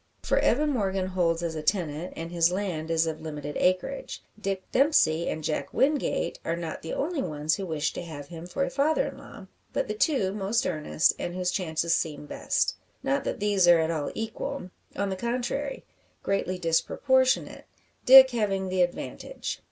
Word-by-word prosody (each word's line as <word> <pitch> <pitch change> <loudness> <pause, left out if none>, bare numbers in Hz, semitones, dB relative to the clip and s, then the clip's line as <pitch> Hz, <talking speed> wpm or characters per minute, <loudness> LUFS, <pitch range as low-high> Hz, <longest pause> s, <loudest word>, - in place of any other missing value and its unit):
For - - +2
Evan 295 +5 +2
Morgan 195 -6 0
holds 175 -2 0
as 170 -1 -2
a 155 - -4
tenant, 165 -1 -1
and 165 +1 -6
his 170 0 +3
land 180 -5 -3
is 165 0 +2
of 160 -1 -4
limited 150 -2 -6
acreage. 185 - -1 0.2
Dick 195 -1 -2
Dempsey 210 - +3
and 155 - -4
Jack 150 - -2
Wingate 270 - +1
are 165 - -1
not 170 -2 -5
the 165 - -6
only 305 0 -1
ones 150 - -1
who 195 +1 -2
wish 155 -2 -1
to - - -5
have 155 -4 -8
him 170 0 -8
for 275 +10 -1
a - - -2
father 310 - +1
in - - -11
law, - - -12 0.3
but - - -1
the - - -2
two 270 - +1
most 210 +3 0
earnest, 155 -2 +1
and 175 - -4
whose 180 -1 0
chances 165 -2 0
seem 150 -2 -3
best. - - -1 0.3
Not 275 0 0
that - - -3
these 200 -3 +3
are 175 -1 +8
at 160 +1 +1
all 155 -3 -2
equal; 220 -4 -4 0.2
on 200 0 -1
the - - -1
contrary, 245 +6 -3 0.4
greatly 190 -2 -1
disproportionate, 260 - +1 0.4
Dick 260 0 +10
having 195 -5 -1
the 185 0 +1
advantage. 180 - -3
185 Hz, 185 wpm, -27 LUFS, 165-240 Hz, 0.4 s, Dick